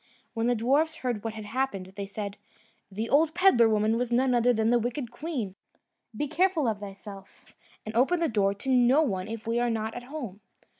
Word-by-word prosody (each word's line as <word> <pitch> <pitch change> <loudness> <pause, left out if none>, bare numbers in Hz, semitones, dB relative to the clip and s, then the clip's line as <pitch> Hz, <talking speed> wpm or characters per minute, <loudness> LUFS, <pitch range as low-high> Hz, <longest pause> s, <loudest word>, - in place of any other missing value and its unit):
When 225 +1 -1
the 245 - +2
dwarfs 280 +8 +2
heard 245 -9 -3
what 225 -1 -4
had 215 -1 -7
happened, 205 -5 -3
they 200 -1 -5
said, 205 0 -6 0.5
"The 215 +4 -3
old 310 +4 +3
pedlar 345 -12 +5
woman 215 +1 +2
was 245 0 -2
none 255 +2 +3
other 245 0 +4
than 220 -1 +1
the 240 - +4
wicked 240 +1 -3
queen. 245 - -4 0.6
Be 295 - -1
careful 330 -1 +1
of 215 -2 -1
thyself, 200 -1 -11 0.3
and 215 - -5
open 270 +10 +3
the 335 - +2
door 200 -4 +1
to 205 +7 -6
no 255 +4 +5
one 190 -8 -2
if 225 0 -6
we 230 +1 0
are 240 0 +1
not 220 -1 -2
at 245 - -6
home." 245 -8 -7
235 Hz, 205 wpm, -27 LUFS, 215-265 Hz, 0.6 s, pedlar